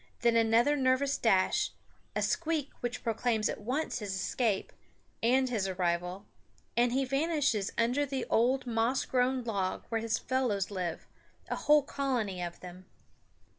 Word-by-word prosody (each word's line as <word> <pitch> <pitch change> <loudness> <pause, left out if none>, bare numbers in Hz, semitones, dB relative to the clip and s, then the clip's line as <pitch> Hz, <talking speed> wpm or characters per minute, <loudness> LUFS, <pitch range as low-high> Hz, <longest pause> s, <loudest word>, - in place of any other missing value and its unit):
Then 235 -1 +3
another 230 +5 +4
nervous 265 +1 +2
dash, 225 - +2 0.4
a - - 0
squeak 320 -4 -1
which 245 0 -4
proclaims 225 -1 +1
at - - -5
once 255 +4 -2
his 200 -3 -4
escape, 205 +1 -1 0.5
and 255 +3 +3
his 220 -6 -1
arrival, 180 +1 -2 0.5
and 240 +1 +3
he 270 +2 +1
vanishes 275 - +1
under 245 +5 +2
the 270 -3 -3
old 255 +3 +2
moss 235 +2 +1
grown 255 0 +1
log 200 -5 -2
where 225 -1 -1
his 225 0 0
fellows 240 -7 -1
live, 180 -4 -3 0.4
a - - -1
whole 300 -1 +4
colony 245 -10 -2
of 175 -1 -5
them. 180 +1 -11
235 Hz, 145 wpm, -31 LUFS, 205-265 Hz, 0.5 s, another